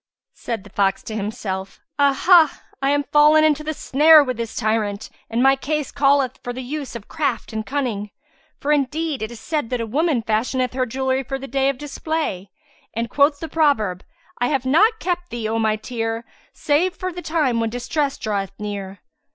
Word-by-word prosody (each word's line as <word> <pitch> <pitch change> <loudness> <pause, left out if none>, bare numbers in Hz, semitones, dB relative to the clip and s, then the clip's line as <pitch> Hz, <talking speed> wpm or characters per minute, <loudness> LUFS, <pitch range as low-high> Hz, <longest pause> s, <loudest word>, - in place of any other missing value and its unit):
Said 225 -4 -5
the 205 - -15
fox 195 -1 +1
to 220 - -6
himself, 200 -3 -4 0.2
"Ah! 280 -1 +2
Ah! 340 -5 +6 0.2
I 275 - +2
am 290 0 +2
fallen 300 +2 +5
into 305 -1 +2
the 310 0 -3
snare 305 +3 +6
with 255 -2 -3
this 230 -1 -5
tyrant, 215 -2 -1 0.2
and 230 +2 +1
my 270 0 +6
case 300 +1 -2
calleth 275 -2 +2
for 245 - -4
the 255 +1 -6
use 275 -1 -5
of 225 -3 -8
craft 275 -8 -2
and 220 0 -2
cunning; 235 -6 -2 0.5
for 290 - -1
indeed 300 0 0
it 220 - -3
is 235 -2 -10
said 295 -5 -2
that 250 - -1
a 230 - -2
woman 280 +1 0
fashioneth 250 +3 0
her 255 0 0
jewellery 265 +2 0
for 270 +1 -4
the 270 +1 -8
day 270 +1 +1
of 275 - -2
display, 295 - -3 0.5
and 230 +1 -2
quoth 285 0 +3
the 325 - -5
proverb, 225 - +1 0.4
'I 245 - +2
have 265 -1 -1
not 420 - +4
kept 355 -1 -2
thee, 235 -2 -3
O 225 +1 -1
my 220 -1 +2
tear, 225 0 -4 0.3
save 340 +5 +1
for 370 -1 -4
the 355 - -6
time 300 -9 0
when 225 -1 0
distress 275 +4 -2
draweth 200 -3 -3
near.' 200 -2 -6
260 Hz, 195 wpm, -21 LUFS, 225-295 Hz, 0.5 s, Ah